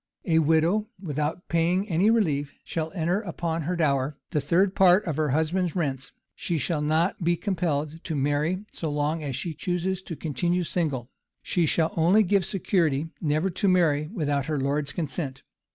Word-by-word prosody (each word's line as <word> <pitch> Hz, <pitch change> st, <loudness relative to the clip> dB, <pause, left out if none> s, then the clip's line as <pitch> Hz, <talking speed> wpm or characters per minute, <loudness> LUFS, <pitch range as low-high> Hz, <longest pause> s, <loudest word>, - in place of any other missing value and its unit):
A 160 Hz, -3 st, +3 dB
widow, 165 Hz, +7 st, +2 dB
without 155 Hz, 0 st, -3 dB
paying 175 Hz, +4 st, +1 dB
any 185 Hz, +3 st, +3 dB
relief, 150 Hz, -11 st, +1 dB
shall 160 Hz, -1 st, -3 dB
enter 175 Hz, +2 st, 0 dB
upon 170 Hz, -4 st, -3 dB
her 175 Hz, +4 st, -2 dB
dower, 140 Hz, -3 st, +1 dB
the 150 Hz, -, +1 dB
third 180 Hz, +7 st, +2 dB
part 190 Hz, +2 st, +5 dB
of 160 Hz, -5 st, -2 dB
her 155 Hz, -1 st, 0 dB
husband's 160 Hz, +5 st, 0 dB
rents: 135 Hz, -6 st, -2 dB, 0.2 s
she 170 Hz, -, -2 dB
shall 155 Hz, 0 st, -1 dB
not 160 Hz, +5 st, +1 dB
be 175 Hz, +1 st, +3 dB
compelled 165 Hz, -5 st, -2 dB
to 160 Hz, -, -2 dB
marry, 150 Hz, +7 st, 0 dB
so 160 Hz, -, -4 dB
long 150 Hz, +2 st, -1 dB
as 140 Hz, -4 st, -3 dB
she 170 Hz, +4 st, -3 dB
chooses 180 Hz, +4 st, -2 dB
to 175 Hz, -3 st, -7 dB
continue 175 Hz, +4 st, -1 dB
single; 145 Hz, -8 st, -2 dB, 0.3 s
she 170 Hz, -3 st, +1 dB
shall 160 Hz, 0 st, +1 dB
only 180 Hz, +7 st, +4 dB
give 195 Hz, -1 st, +2 dB
security 165 Hz, -6 st, 0 dB
never 155 Hz, +4 st, +1 dB
to 200 Hz, +4 st, 0 dB
marry 160 Hz, -5 st, +3 dB
without 145 Hz, -, -1 dB
her 155 Hz, -2 st, -1 dB
lord's 140 Hz, +1 st, -1 dB
consent. 145 Hz, -4 st, -4 dB
165 Hz, 170 wpm, -26 LUFS, 150-180 Hz, 0.3 s, part